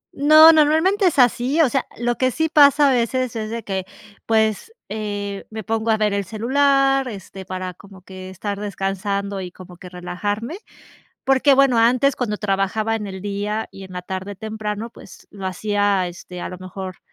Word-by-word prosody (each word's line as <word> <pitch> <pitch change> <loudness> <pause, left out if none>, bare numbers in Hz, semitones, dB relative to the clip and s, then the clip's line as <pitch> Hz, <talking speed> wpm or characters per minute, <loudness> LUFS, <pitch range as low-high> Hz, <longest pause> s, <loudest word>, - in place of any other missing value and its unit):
No, 310 +3 +8
normalmente 320 +6 +3
es 340 - 0
así, 250 +3 +3
o 280 - +3
sea, - - -1
lo 240 +1 -1
que 255 - +3
sí 320 +5 0
pasa 290 -1 +5
a - - +3
veces 245 +1 0
es 220 -1 -4
de 230 0 -5
que 190 -2 -3 0.4
pues, 220 - +1 0.2
eh, 205 -1 -5
me 220 0 -7
pongo 225 +3 -2
a 220 - +3
ver 210 -1 +1
el 200 0 -1
celular, 270 +6 +2
este, 195 -3 -9
para 185 0 -5
como 195 0 -16
que 185 0 -10
estar 200 +2 -5
descansando 200 0 -3
y 180 - -6
como 180 0 -13
que 180 - -11
relajarme, 205 - -4 0.7
porque 270 +1 +4
bueno, 270 -2 +4
antes, 250 +4 +3
cuando 220 -4 -2
trabajaba 210 +2 -1
en 210 -2 -4
el 190 -1 -7
día 205 +2 -3
y 195 - -11
en 190 -1 -11
la 180 - -5
tarde 190 +2 -6
temprano, 220 +1 -5
pues - - -15
lo 195 -2 -9
hacía 200 0 0
este 175 0 -9
a - - -4
lo 180 - -8
mejor, 185 0 -8
210 Hz, 185 wpm, -21 LUFS, 195-250 Hz, 0.7 s, No